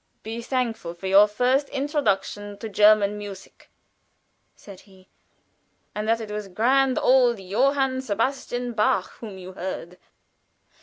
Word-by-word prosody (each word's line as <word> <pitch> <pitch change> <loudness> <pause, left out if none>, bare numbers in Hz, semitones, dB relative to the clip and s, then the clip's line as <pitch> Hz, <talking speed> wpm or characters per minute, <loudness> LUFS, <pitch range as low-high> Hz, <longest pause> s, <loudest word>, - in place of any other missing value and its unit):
"Be 225 +2 -5
thankful 230 -8 -3
for 175 - -11
your 195 +2 +6
first 255 +6 +1
introduction 205 -8 -2
to 225 - -6
German 210 0 +4
music," 200 -2 -11 0.9
said 195 -3 -13
he, 190 -2 -21 0.8
"and 210 +1 -4
that 230 0 +2
it 220 -2 -7
was 210 -1 -5
grand 255 +7 +2
old 250 -3 +4
Johann 260 +7 +1
Sebastian 245 +1 -2
Bach 210 -3 +1
whom 210 -5 -8
you 185 0 -9
heard. 180 -1 -6
215 Hz, 130 wpm, -24 LUFS, 195-255 Hz, 0.9 s, your